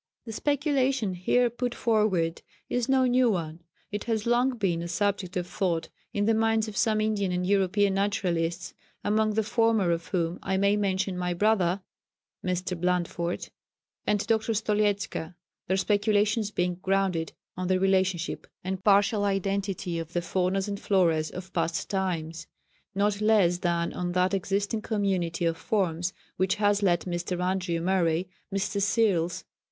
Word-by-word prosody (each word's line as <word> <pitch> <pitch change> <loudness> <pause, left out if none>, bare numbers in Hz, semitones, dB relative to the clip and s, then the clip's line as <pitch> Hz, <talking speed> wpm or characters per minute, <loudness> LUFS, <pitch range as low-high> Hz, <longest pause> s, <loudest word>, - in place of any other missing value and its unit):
The 225 - -6
speculation 275 - +1
here 215 +7 +2
put 245 +1 -3
forward 205 -8 +1 0.3
is 245 0 -1
no 265 -1 +4
new 250 0 +4
one. 165 -5 -2 0.3
It 205 0 -4
has 220 -2 -1
long 245 +2 +2
been 180 -6 0
a 170 - -4
subject 190 0 -1
of 180 - -1
thought 175 -2 -1 0.2
in 205 0 0
the 225 - +3
minds 225 0 +2
of 215 - -7
some 215 -1 +2
Indian 210 -3 0
and 180 0 -1
European 200 +1 +2
naturalists, 180 -4 -1 0.3
among 215 0 +1
the 220 - +2
former 220 -4 +2
of 170 0 -2
whom 170 -2 -1
I 190 0 -1
may 200 +1 +3
mention 195 -2 -1
my 180 -1 -1
brother 190 -2 +2 0.6
[Mr. 180 0 -1
Blandford] 175 -1 -1 0.6
and 210 -1 +1
Dr. 225 0 +1
Stoliezka, 205 -5 0 0.3
their 190 - +1
speculations 210 +1 +2
being 180 -3 -1
grounded 190 -4 0 0.2
on 185 0 -3
the 185 0 +2
relationship 190 -2 0 0.2
and 190 +1 -4
partial 205 +1 +4
identity 195 -3 -1
of 165 0 -7
the 175 - 0
faunas 185 +3 0
and 200 -1 -4
floras 165 -5 +2
of 185 +1 -9
past 165 +1 -1
times, 165 -4 -2 0.5
not 205 +1 +1
less 205 -5 +4
than 170 -1 0
on 175 0 -3
that 180 +2 +2
existing 200 +3 -1
community 190 -6 -1
of 165 -1 0
forms 180 -6 0 0.3
which 185 0 +2
has 205 -1 +2
led 175 -4 +3
Mr. 175 0 -3
Andrew 180 -2 0
Murray, 175 -1 +1 0.2
Mr. 200 +1 -1
Searles, 195 -5 +1
V. - - -46
195 Hz, 155 wpm, -27 LUFS, 175-210 Hz, 0.6 s, no